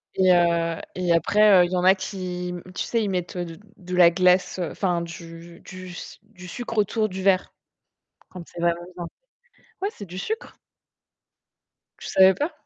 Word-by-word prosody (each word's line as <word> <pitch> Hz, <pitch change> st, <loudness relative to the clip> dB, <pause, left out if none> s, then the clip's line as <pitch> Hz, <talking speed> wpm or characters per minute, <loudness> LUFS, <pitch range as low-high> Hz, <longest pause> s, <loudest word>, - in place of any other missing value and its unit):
Et 185 Hz, -1 st, +3 dB
heu 170 Hz, -1 st, +1 dB
et 180 Hz, -2 st, +1 dB
après, 200 Hz, +3 st, +5 dB
heu, -, -, +2 dB
il 175 Hz, -, -6 dB
y -, -, 0 dB
en 180 Hz, -, 0 dB
a 190 Hz, +1 st, +7 dB
qui 185 Hz, -2 st, -5 dB
m 180 Hz, -1 st, -6 dB
tu -, -, -2 dB
sais, 230 Hz, -1 st, -1 dB
ils 205 Hz, -, -1 dB
mettent, 180 Hz, -1 st, -3 dB
heu, 175 Hz, -, -2 dB
d 165 Hz, 0 st, -10 dB, 0.2 s
de 180 Hz, -1 st, -6 dB
la 175 Hz, -1 st, +7 dB
glace, 180 Hz, +1 st, +2 dB
heu, 170 Hz, -4 st, -2 dB
enfin 180 Hz, -3 st, -1 dB
du 170 Hz, 0 st, -10 dB
du 185 Hz, -1 st, -10 dB
s 175 Hz, -, -10 dB
du 195 Hz, -4 st, -14 dB
sucre 235 Hz, +1 st, -6 dB
autour 215 Hz, +1 st, +1 dB
du 190 Hz, 0 st, -6 dB
verre. 190 Hz, -1 st, +2 dB, 0.8 s
Quand 180 Hz, -2 st, -9 dB
c'est 170 Hz, -, -9 dB
vraiment 170 Hz, 0 st, +1 dB, 0.2 s
bien. 175 Hz, -1 st, -5 dB, 0.8 s
Ouais, 400 Hz, -, +1 dB
c'est 205 Hz, -, -9 dB
du 180 Hz, +1 st, -8 dB
sucre. 440 Hz, -, -5 dB, 1.4 s
Tu -, -, -8 dB
savais 190 Hz, 0 st, +6 dB
pas? 295 Hz, -, -2 dB
180 Hz, 195 wpm, -24 LUFS, 175-190 Hz, 1.4 s, a